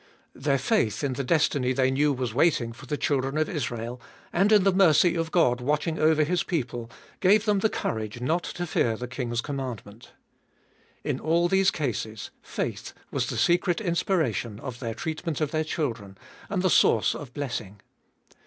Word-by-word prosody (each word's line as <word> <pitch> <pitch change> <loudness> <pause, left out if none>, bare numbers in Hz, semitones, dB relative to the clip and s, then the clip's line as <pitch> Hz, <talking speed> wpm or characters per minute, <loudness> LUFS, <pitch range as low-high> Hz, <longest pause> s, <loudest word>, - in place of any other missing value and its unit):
Their 140 +1 0
faith 135 - 0
in 140 -2 0
the 140 - -3
destiny 135 -3 +2
they 130 0 +2
knew 145 +2 +2
was 125 -4 -2
waiting 125 -4 +2
for - - -13
the 150 - -2
children 135 0 0
of 155 - +1
Israel, 120 - -4 0.3
and 195 +4 +3
in 210 -3 +6
the 195 0 +3
mercy 180 -2 +5
of 165 -1 -2
God 125 -8 +2
watching 150 +4 0
over 155 0 +4
his 175 +3 +1
people, 120 -8 -3 0.3
gave 205 +3 +4
them 210 -2 +2
the 220 - +2
courage 110 - -3
not 160 +8 0
to 175 - -3
fear 115 -8 0
the 125 - -5
king's 120 -2 -3
commandment. 125 -6 -6 0.9
In - - -2
all 170 +2 +2
these 190 +1 +3
cases 110 -8 -3
faith - - -4 0.2
was - - -1
the - - -3
secret 175 0 +2
inspiration 160 - -1
of 125 -2 -7
their 115 -3 -4
treatment 160 +2 -3
of 155 -2 -1
their 155 0 0
children, 115 - -4 0.3
and 190 -2 -1
the 185 - +3
source 110 -5 +4
of 140 -5 -8
blessing. 115 -8 -4
145 Hz, 175 wpm, -26 LUFS, 120-170 Hz, 0.9 s, in